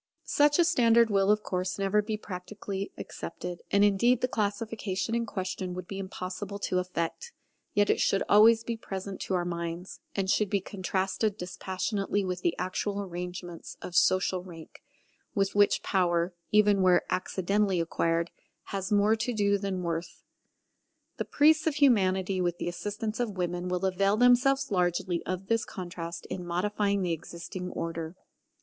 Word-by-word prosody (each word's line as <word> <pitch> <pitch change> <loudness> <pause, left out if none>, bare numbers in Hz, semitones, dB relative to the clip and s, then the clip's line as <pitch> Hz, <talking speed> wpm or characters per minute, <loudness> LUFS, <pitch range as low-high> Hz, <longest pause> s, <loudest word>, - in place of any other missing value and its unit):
Such 290 0 +3
a 345 - +6
standard 235 -8 +4
will 195 0 +3
of 210 0 +3
course 185 0 -2
never 195 +1 +2
be 215 +1 -3
practically 195 0 -6
accepted, 175 +1 -6
and 200 0 +4
indeed 230 +5 +3
the 250 - +2
classification 215 -2 -2
in 235 0 0
question 185 -2 -4
would 180 -1 -6
be 195 - -5
impossible 190 +1 -5
to 185 -2 0
effect: 180 - -3 0.4
yet 205 0 +4
it - - 0
should 195 - +2
always 225 +2 +6
be 230 0 -3
present 195 -3 -6
to 190 - -1
our 175 -1 0
minds; 170 +1 -5 0.2
and 195 -1 0
should 205 +1 +2
be 200 - +2
contrasted 195 +2 -1
dispassionately 195 +2 -2
with 180 -1 -3
the 170 -1 0
actual 195 +2 -2
arrangements 180 -2 -6
of 175 - -8
social 185 +1 +3
rank, 170 -3 -12 0.5
with 195 -2 +1
which 205 0 +3
power, 175 -1 +1 0.2
even 210 -2 +4
where 180 -1 +5
accidentally 190 +1 0
acquired, 165 0 0 0.4
has 195 +1 -3
more 205 +1 +4
to 225 +2 -2
do 200 -1 +2
than 190 -2 -3
worth. 170 0 -4 0.9
The - - -2
priests 310 +2 +4
of 310 - +1
Humanity 190 -9 +3
with 175 -1 0
the - - -4
assistance 210 +5 -4
of 220 -5 -2
women 175 0 -2
will 180 +1 -1
avail 195 +2 +2
themselves 250 +2 +4
largely 180 -1 0
of 185 +1 -3
this 230 +2 +1
contrast 170 -2 -6
in 180 - -5
modifying 200 +3 0
the 175 -2 0
existing 170 +2 -6
order. 165 0 -4
195 Hz, 160 wpm, -29 LUFS, 180-210 Hz, 0.9 s, a